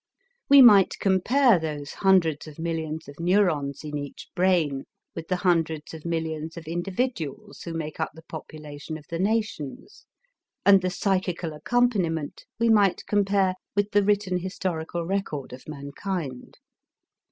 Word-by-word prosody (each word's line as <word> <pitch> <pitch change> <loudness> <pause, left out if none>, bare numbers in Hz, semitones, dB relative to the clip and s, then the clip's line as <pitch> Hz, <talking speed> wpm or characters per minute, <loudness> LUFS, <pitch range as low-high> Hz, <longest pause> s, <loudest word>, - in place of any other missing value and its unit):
We 280 -1 +9
might 205 -6 +7
compare 215 +4 +3
those 150 -3 -5
hundreds 170 -6 +2
of 150 - -11
millions 160 -2 -3
of 140 +2 -12
neurons 165 -7 +1
in 150 -1 -4
each 145 -1 -8
brain 175 -7 +1 0.3
with 165 -1 -7
the 185 - 0
hundreds 165 -5 0
of 160 0 -10
millions 160 -1 -3
of 165 - -8
individuals 190 - -3
who 170 - -6
make 155 -2 -5
up - - 0
the 160 - -13
population 155 -1 -8
of 150 - -15
the 165 - -3
nations, 210 - -3 0.6
and 195 -1 +7
the 185 - 0
psychical 185 -4 -1
accompaniment 180 -6 0
we 230 - +3
might 205 -4 +3
compare 200 -2 +2 0.2
with 205 0 +1
the 205 - +4
written 200 -3 +1
historical 175 -2 -3
record 165 -9 -3
of 130 - -11
mankind. 145 -1 -5
170 Hz, 140 wpm, -25 LUFS, 155-195 Hz, 0.6 s, We